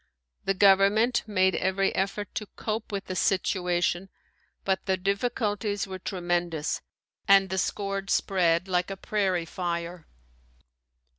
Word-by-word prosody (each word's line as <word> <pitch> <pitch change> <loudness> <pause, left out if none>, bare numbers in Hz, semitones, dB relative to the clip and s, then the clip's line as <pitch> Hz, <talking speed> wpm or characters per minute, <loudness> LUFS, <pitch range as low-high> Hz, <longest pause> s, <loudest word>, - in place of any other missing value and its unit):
The 195 - +1
government 200 +5 +4
made 190 -2 +2
every 190 +1 +1
effort 195 +1 -2
to 210 - -4
cope 220 0 -4
with 200 -1 -3
the 185 - -5
situation 180 -1 0 0.6
but 190 -1 0
the 190 -1 +2
difficulties 205 +1 -1
were 190 -1 -7
tremendous 175 -4 -2 0.5
and 195 -2 +5
the 190 - 0
scourge 195 0 -2
spread 175 -2 +2
like 180 0 0
a 195 - -5
prairie 190 -4 0
fire. 170 -1 -4
190 Hz, 125 wpm, -27 LUFS, 180-200 Hz, 0.6 s, and